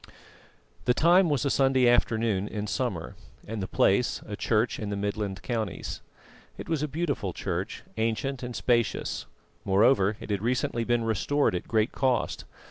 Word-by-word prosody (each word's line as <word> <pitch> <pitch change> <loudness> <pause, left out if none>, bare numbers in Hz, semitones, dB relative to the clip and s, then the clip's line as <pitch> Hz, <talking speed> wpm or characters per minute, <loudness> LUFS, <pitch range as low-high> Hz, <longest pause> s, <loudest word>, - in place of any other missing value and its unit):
The 125 - +3
time 175 +4 +5
was 145 -1 +1
a 140 - +2
Sunday 135 -2 +3
afternoon 110 -4 +2
in 105 -1 -4
summer, 105 -6 -3 0.3
and 110 -1 -4
the 95 - -3
place 100 +6 +2
a 105 - -5
church 110 +2 0
in 105 - -4
the 100 - -2
Midland 100 -2 -3
counties. 110 0 -3 0.6
It - - -7
was 160 -3 -1
a 150 - 0
beautiful 140 - -2
church, - - -4
ancient 115 +4 -1
and 125 -1 -5
spacious; 120 -4 0 0.4
moreover, 100 0 +3
it - - -7
had 100 -2 0
recently 120 0 0
been 120 0 +1
restored 115 +6 +1
at 90 - -3
great 110 +1 +1
cost. 130 -3 0
115 Hz, 160 wpm, -27 LUFS, 105-130 Hz, 0.6 s, time